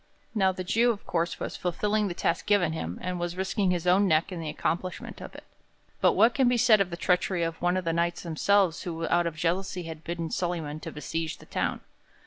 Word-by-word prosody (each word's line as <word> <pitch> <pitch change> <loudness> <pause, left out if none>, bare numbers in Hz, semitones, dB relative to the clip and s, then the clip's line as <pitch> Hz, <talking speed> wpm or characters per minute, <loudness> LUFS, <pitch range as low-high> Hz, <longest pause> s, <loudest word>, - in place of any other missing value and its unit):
Now 190 -4 +3
the 185 0 -5
Jew, 230 +6 +3
of 220 -4 -2
course, 170 0 -1
was - - -4
fulfilling 210 +4 0
the 175 - -4
task 170 - -1
given 190 -6 +3
him, 85 - -4
and 180 -1 -2
was 175 +1 -3
risking 190 +1 0
his 180 -1 0
own 190 +3 +4
neck 160 +2 +2
in 180 - -5
the 160 -2 -4
accomplishment 170 +4 -3
of - - -9
it. - - -10 0.6
But - - +4
what 230 +1 +5
can 265 -3 +3
be 245 0 +3
said 225 -3 +5
of 190 - +1
the 170 - -5
treachery 180 0 +1
of 165 0 -3
one 175 +1 +2
of 185 - -3
the 165 - +1
Knights 170 +1 0
themselves 175 +1 +2
who 165 -2 -3
out 175 0 +3
of 165 - -4
jealousy 180 +3 -1
had 160 -1 -8
bidden 170 -1 -4
Solyman 165 -4 -2
to - - -7
besiege 160 +1 -4
the - - -15
town? - - -2
175 Hz, 230 wpm, -27 LUFS, 165-190 Hz, 0.6 s, what